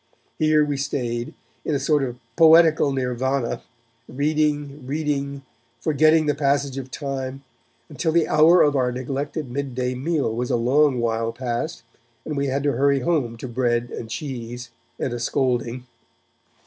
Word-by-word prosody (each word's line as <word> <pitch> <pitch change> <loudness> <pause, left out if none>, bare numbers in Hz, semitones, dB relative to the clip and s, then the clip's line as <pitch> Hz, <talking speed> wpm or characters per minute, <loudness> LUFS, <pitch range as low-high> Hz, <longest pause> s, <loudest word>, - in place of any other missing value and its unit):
Here 155 -1 +4
we 145 -1 -2
stayed, 120 -4 -3 0.3
in 155 - -1
a - - 0
sort 150 0 +2
of 125 -2 -3 0.2
poetical 160 -2 +6
nirvana, 130 -1 -1 0.5
reading, 145 0 -1
reading, 140 -1 -2 0.4
forgetting 155 +1 +3
the 145 - +2
passage 140 -1 0
of 130 -1 -8
time, 135 -1 -5 0.4
until 150 +2 -2
the 165 0 +3
hour 165 +4 +6
of 145 -1 +2
our 125 -2 +1
neglected 135 +2 -4
mid 135 -1 -4
day 125 0 -1
meal 140 -2 -1
was 125 +1 -2
a - - +2
long 130 +3 +3
while 115 -1 0
past, 130 +7 -4 0.4
and 155 - -4
we 140 0 0
had 135 +1 -1
to 145 - +2
hurry 140 0 +2
home 125 -7 0
to 130 - -6
bread 120 -1 0
and 115 - -6
cheese 125 -2 -6 0.3
and 130 - -2
a 120 - -4
scolding. 125 0 -1
135 Hz, 155 wpm, -23 LUFS, 125-150 Hz, 0.5 s, poetical